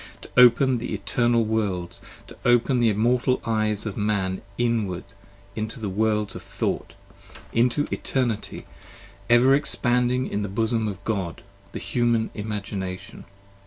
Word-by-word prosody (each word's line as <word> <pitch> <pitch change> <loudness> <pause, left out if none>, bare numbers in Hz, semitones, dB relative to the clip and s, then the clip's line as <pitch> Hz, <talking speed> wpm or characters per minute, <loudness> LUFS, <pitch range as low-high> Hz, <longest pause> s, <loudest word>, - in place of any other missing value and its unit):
To - - -11
open 125 +1 +6
the 120 - -3
Eternal 120 -1 +1
Worlds, 100 -6 -1 0.2
to - - -13
open 120 +1 +3
the 120 -1 +4
immortal 120 +4 +2
Eyes 110 -2 0
Of 105 - -4
Man 100 -3 0 0.2
inwards 105 -5 -1 0.4
into 110 +1 -4
the 105 -3 -3
Worlds 105 +1 0
of - - -6
Thought: - - -3 0.6
into 125 +5 +2
Eternity 120 -5 -1
20 - - -22 0.6
Ever 120 +3 +6
expanding 125 -2 +1
in 105 - -2
the 100 - -3
Bosom 110 +2 0
of 100 -1 -6
God, 95 -6 -3 0.3
the - - -6
Human 120 -2 0
Imagination. 100 -2 -5
110 Hz, 135 wpm, -24 LUFS, 105-120 Hz, 0.6 s, open